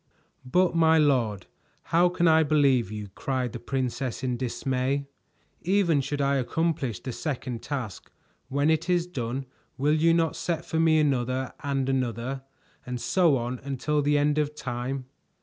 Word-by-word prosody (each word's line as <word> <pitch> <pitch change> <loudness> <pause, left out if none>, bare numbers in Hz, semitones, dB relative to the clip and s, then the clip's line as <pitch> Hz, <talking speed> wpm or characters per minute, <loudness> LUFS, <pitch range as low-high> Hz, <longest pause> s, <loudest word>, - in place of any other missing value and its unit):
"But, 180 -1 +3
my 160 -1 +5
lord, 120 - +2 0.5
how 175 +2 +5
can 175 -1 +1
I 160 0 +6
believe 140 -8 +3
you?" 105 -2 -6
cried 130 -2 -2
the 120 - -5
princess 130 0 -3
in 125 -1 0
dismay. 130 +2 -1 0.6
"Even 175 -5 +2
should 145 +2 -3
I 140 0 +2
accomplish 135 - -1
the 130 - -5
second 125 -4 -4
task, 130 -9 -5 0.4
when 145 +3 +2
it 160 +3 0
is 175 -1 +2
done 130 -5 -4 0.3
will 145 +3 +2
you 160 +2 +4
not 165 -1 +1
set 165 -2 -2
for 160 - -1
me 160 -1 +4
another 130 -3 0
and 135 -2 -1
another, 130 0 -1 0.4
and 125 -1 -5
so 170 0 +3
on 120 +1 -3
until 140 +2 -1
the 145 +1 +2
end 145 +1 +2
of 150 0 -1
time?" 125 0 -4
140 Hz, 160 wpm, -27 LUFS, 125-160 Hz, 0.6 s, I